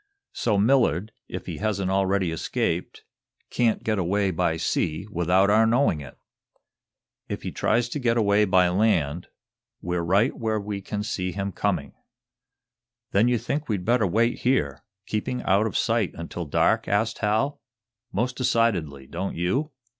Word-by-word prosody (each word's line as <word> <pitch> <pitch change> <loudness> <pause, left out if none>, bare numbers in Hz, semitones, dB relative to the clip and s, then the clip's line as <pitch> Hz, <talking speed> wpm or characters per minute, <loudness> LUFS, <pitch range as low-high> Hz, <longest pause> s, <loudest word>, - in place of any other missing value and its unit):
So 105 -4 0
Millard, 110 -3 +2 0.2
if - - -6
he - - -5
hasn't 100 -3 -1
already 95 -2 +1
escaped, 80 - -2 0.5
can't 120 -2 +1
get 110 -2 0
away 95 +2 +1
by 80 -1 0
sea 80 +2 -1
without 90 +3 +3
our 110 +1 +5
knowing 115 - +2
it. 65 -2 -11 1.1
If - - -4
he - - -4
tries 120 +2 +1
to 145 - -3
get 120 -2 +1
away 105 -1 +3
by 95 -2 +4
land, 90 -5 +1 0.5
we're 90 0 -2
right 100 +9 +2
where 110 -1 -1
we 100 -1 -5
can 105 +1 -4
see 95 -4 -3
him 100 +2 -3
coming." - - -2 1.2
"Then 105 +4 +4
you 125 0 +2
think 145 +5 -3
we'd 100 -4 -1
better 115 -3 +3
wait 115 +6 +1
here, 75 - 0 0.2
keeping 110 +4 -3
out 100 +3 +3
of - - -2
sight, 115 -4 +1
until 85 +1 -6
dark?" - - +2
asked 110 +3 0
Hal. 110 +7 0 0.5
"Most 125 +6 -1
decidedly. 95 - 0
Don't 95 +8 -4
you?" 125 - -1
100 Hz, 155 wpm, -25 LUFS, 90-115 Hz, 1.2 s, our